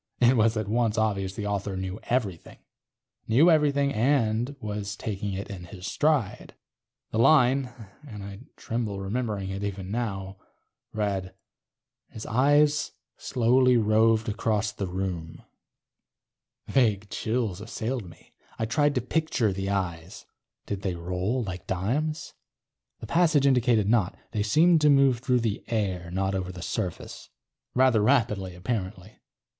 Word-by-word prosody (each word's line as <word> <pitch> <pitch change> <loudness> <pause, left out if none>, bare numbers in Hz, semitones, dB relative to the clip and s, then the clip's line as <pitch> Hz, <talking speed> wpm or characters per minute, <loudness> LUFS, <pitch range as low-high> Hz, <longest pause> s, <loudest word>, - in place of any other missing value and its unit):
It 125 +1 +5
was 110 -1 +3
at 110 -2 -2
once 115 0 +1
obvious 100 -3 0
the 105 - -4
author 100 -1 -2
knew 95 +2 -4
everything. 105 -9 -2 0.7
Knew 145 +10 +5
everything 140 -3 +2
and 120 +1 +1
was 105 -3 -4
taking 100 -2 -4
it 100 +2 -5
in 90 -3 -8
his 90 +1 -10
stride. 145 -4 0 0.6
The 110 - -1
line 130 -1 +4 0.4
(and 105 -6 -8
I 100 0 -8 0.2
tremble 115 -4 -3
remembering 100 -1 -3
it 100 +1 -4
even 100 -1 -4
now) 100 -5 -3 0.5
read:... 95 -3 -2 0.7
his 110 - -8
eyes 145 +5 +3 0.2
slowly 125 0 +3
roved 110 0 +3
about 105 -1 -1
the 100 - -2
room. 90 -3 -5 1.2
Vague 105 -6 +1
chills 110 -5 -2
assailed 115 -1 -4
me. 85 - -19 0.2
I 110 - -1
tried 145 +5 +1
to 125 - +1
picture 125 -5 0
the 95 +1 -3
eyes. 90 -2 -4 0.4
Did 100 -1 -4
they 95 -3 -2
roll 90 +8 -2
like 90 -4 -7
dimes? 140 - -2 0.7
The - - -6
passage 165 -5 +3
indicated 120 -6 +3
not; 105 -5 +1
they 105 - -1
seemed 155 +11 +4
to 150 - +5
move 135 -3 +4
through 125 -1 +1
the 110 -3 -2
air, 95 -6 -2
not 95 +2 -1
over 95 -1 -3
the 90 -2 -8
surface. 90 -1 -5 0.5
Rather 125 -4 +4
rapidly, 105 -7 +1
apparently. 95 0 -5
110 Hz, 140 wpm, -26 LUFS, 95-125 Hz, 1.2 s, It